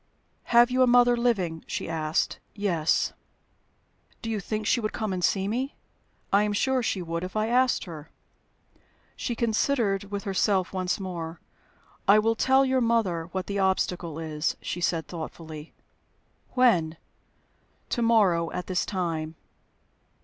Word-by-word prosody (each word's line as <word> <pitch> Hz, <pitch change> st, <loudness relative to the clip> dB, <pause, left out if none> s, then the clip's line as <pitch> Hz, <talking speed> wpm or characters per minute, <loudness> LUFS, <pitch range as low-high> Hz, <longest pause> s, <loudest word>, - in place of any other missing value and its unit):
"Have 240 Hz, +1 st, +5 dB
you 255 Hz, +1 st, +2 dB
a 255 Hz, -, +6 dB
mother 245 Hz, 0 st, +5 dB
living?" 195 Hz, -10 st, 0 dB
she -, -, -4 dB
asked. 160 Hz, -1 st, -1 dB, 0.2 s
"Yes." 175 Hz, -7 st, +1 dB, 1.1 s
"Do 225 Hz, -, -3 dB
you 215 Hz, -, -1 dB
think 215 Hz, +2 st, -3 dB
she 240 Hz, -, +3 dB
would 215 Hz, -2 st, -3 dB
come 215 Hz, -4 st, -2 dB
and 180 Hz, -1 st, -3 dB
see 195 Hz, +1 st, +2 dB
me?" 255 Hz, +6 st, -2 dB, 0.6 s
"I 200 Hz, -, +6 dB
am 210 Hz, 0 st, 0 dB
sure 260 Hz, +5 st, +1 dB
she 195 Hz, -5 st, -1 dB
would 170 Hz, 0 st, -3 dB
if 185 Hz, +2 st, -6 dB
I 215 Hz, 0 st, +1 dB
asked 250 Hz, +1 st, +3 dB
her." 160 Hz, -4 st, -9 dB, 1.1 s
She 240 Hz, -, -3 dB
considered 225 Hz, -3 st, +1 dB
with 200 Hz, 0 st, -5 dB
herself 195 Hz, -2 st, +1 dB
once 185 Hz, 0 st, -1 dB
more. 170 Hz, -3 st, -5 dB, 0.7 s
"I 200 Hz, +2 st, +7 dB
will 225 Hz, +1 st, +3 dB
tell 265 Hz, +4 st, +4 dB
your 260 Hz, -1 st, +2 dB
mother 220 Hz, -8 st, +1 dB
what 190 Hz, 0 st, -3 dB
the 200 Hz, 0 st, -3 dB
obstacle 180 Hz, -4 st, 0 dB
is," 155 Hz, -1 st, -2 dB
she 175 Hz, -, -5 dB
said, 165 Hz, -2 st, 0 dB
thoughtfully. 160 Hz, -2 st, -8 dB, 0.8 s
"When?" 175 Hz, -11 st, +3 dB, 0.9 s
"To 240 Hz, -, -1 dB
morrow, 195 Hz, -8 st, +3 dB
at 180 Hz, -, -3 dB
this 185 Hz, -2 st, -1 dB
time." 165 Hz, -4 st, -2 dB
195 Hz, 150 wpm, -26 LUFS, 170-230 Hz, 1.1 s, I